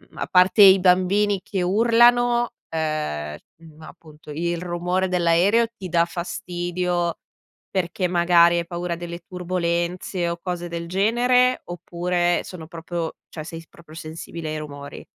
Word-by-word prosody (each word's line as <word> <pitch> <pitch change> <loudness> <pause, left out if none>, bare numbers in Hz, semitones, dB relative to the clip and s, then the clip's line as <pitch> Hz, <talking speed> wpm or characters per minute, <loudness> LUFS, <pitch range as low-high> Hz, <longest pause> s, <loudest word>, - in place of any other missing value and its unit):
a - - -4
parte 185 +3 +5
i 190 0 +8
bambini 190 +3 +3
che 190 0 -3
urlano, 240 +4 +4 0.2
ehm, 155 - -3 0.2
mhmm, 160 -1 -16
appunto, 155 -1 -15
il 170 +2 -2
rumore 180 +1 -1
dell'aereo 180 +6 +3
ti 190 - -6
dà 170 -1 +3
fastidio 175 -1 -3 0.5
perché 185 0 -1
magari 170 -1 +4
hai 170 - -1
paura 175 0 -3
delle 170 0 -7
turbolenze 175 0 -2
o 170 0 -4
cose 175 -2 -4
del 170 0 -5
genere, 245 +7 +2
oppure 175 0 -1
sono 175 -4 -9
proprio 165 0 -5
cioè 155 - -7
sei 165 +1 -8
s 165 - -20
proprio 165 -2 -17
sensibile 160 0 -7
ai 155 - -3
rumori? 145 -2 -9
175 Hz, 140 wpm, -23 LUFS, 170-185 Hz, 0.5 s, i